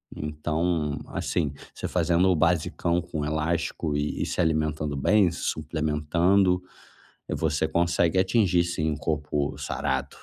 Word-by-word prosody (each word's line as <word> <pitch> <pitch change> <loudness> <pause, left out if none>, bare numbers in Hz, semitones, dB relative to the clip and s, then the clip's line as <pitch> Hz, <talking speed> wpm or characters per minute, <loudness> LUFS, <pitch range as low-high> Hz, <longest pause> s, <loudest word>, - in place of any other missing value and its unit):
Então, 75 0 -1
assim, 70 - -1 0.2
você - - -5
fazendo 90 +2 +2
o 90 - +4
basicão 85 +1 +1
com 75 -3 -4
elástico 80 0 -1
e 75 0 -2
e - - -1
se - - -4
alimentando 75 -2 0
bem, 95 +4 +4
se - - -7
suplementando, 85 +5 +1 0.7
você 80 0 0
consegue 85 +1 +2
atingir 95 -3 +3
sim 80 -2 -1
um 75 - -3
corpo 75 -2 -2
sarado. 65 -1 -2
80 Hz, 130 wpm, -26 LUFS, 75-85 Hz, 0.7 s, o